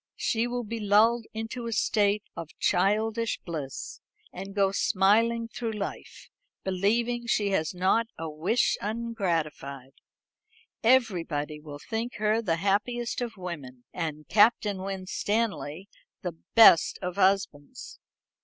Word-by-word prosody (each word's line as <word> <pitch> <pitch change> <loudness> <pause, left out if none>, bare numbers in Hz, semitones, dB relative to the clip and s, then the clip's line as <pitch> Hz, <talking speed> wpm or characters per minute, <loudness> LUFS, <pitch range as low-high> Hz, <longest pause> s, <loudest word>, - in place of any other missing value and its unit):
She 230 +1 0
will 245 0 -3
be 230 +1 -5
lulled 220 +3 +3
into 225 +2 -5
a - - -3
state 210 -2 +1
of 165 -2 -7
childish 215 +4 +1
bliss, 150 -7 -6 0.3
and 195 +2 -8
go 195 -1 +3
smiling 225 +5 +2
through 230 0 -4
life, 205 -2 -6 0.4
believing 230 +6 0
she 210 -3 +1
has 160 -2 0
not 190 +6 +2
a 165 - -4
wish 160 +10 +1
ungratified. 170 - -3 0.9
Everybody 170 - +1
will 150 -1 -9
think 225 - -4
her 215 +1 +1
the 175 -7 0
happiest 220 +7 -1
of 230 -3 -4
women, 145 -9 -7
and 155 -3 -4
Captain 210 -2 +3
Winstanley 195 -2 -2 0.4
the 175 -3 -4 0.2
best 225 -7 +7
of 180 +1 -4
husbands." 190 -7 0
200 Hz, 120 wpm, -27 LUFS, 170-230 Hz, 0.9 s, best